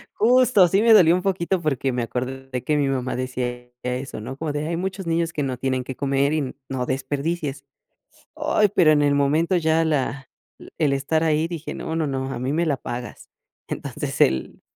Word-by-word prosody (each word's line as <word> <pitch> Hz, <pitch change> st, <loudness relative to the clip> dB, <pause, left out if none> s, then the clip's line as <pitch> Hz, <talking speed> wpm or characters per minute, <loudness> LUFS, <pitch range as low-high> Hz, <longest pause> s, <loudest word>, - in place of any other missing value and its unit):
Justo, 240 Hz, -5 st, +5 dB
sí 195 Hz, +5 st, +2 dB
me 230 Hz, 0 st, +6 dB
dolió 170 Hz, -6 st, +7 dB
un 180 Hz, -, -1 dB
poquito 185 Hz, -1 st, 0 dB
porque 135 Hz, -4 st, 0 dB
me 125 Hz, -1 st, -1 dB
acordé 130 Hz, +1 st, -4 dB
que 150 Hz, -, +1 dB
mi 145 Hz, -2 st, +2 dB
mamá 130 Hz, -1 st, -1 dB
decía 125 Hz, -1 st, -4 dB
eso, 125 Hz, -2 st, -4 dB
¿no? 130 Hz, +5 st, -7 dB
Como 155 Hz, -1 st, -3 dB
de: 150 Hz, +1 st, -3 dB
"Hay 170 Hz, -, -1 dB
muchos 190 Hz, +1 st, -4 dB
niños 165 Hz, 0 st, 0 dB
que 150 Hz, -, -1 dB
no 130 Hz, -2 st, -2 dB
tienen 130 Hz, 0 st, -1 dB
qué 130 Hz, -, -6 dB
comer 140 Hz, +2 st, +1 dB
y 140 Hz, -5 st, -2 dB
no 130 Hz, -2 st, -2 dB
desperdicies". 140 Hz, +2 st, -3 dB, 0.7 s
Ay, 300 Hz, -10 st, +2 dB
pero 175 Hz, -7 st, +5 dB
en 150 Hz, -1 st, +4 dB
el 145 Hz, -1 st, +3 dB
momento 155 Hz, +6 st, +2 dB
ya 160 Hz, 0 st, +2 dB
la 135 Hz, -3 st, -1 dB, 0.5 s
el 150 Hz, -4 st, +2 dB
estar 145 Hz, +4 st, 0 dB
ahí 155 Hz, 0 st, +2 dB
dije: 165 Hz, -2 st, -6 dB
"No, 160 Hz, -, -4 dB
no, 160 Hz, -2 st, 0 dB
no, 135 Hz, -1 st, -3 dB
a -, -, -4 dB
mí 130 Hz, +3 st, -2 dB
me 170 Hz, +2 st, +1 dB
la 145 Hz, -3 st, 0 dB
pagas". 120 Hz, 0 st, -7 dB, 0.4 s
Entonces -, -, -4 dB
el 65 Hz, 0 st, +1 dB
145 Hz, 200 wpm, -23 LUFS, 130-165 Hz, 0.7 s, dolió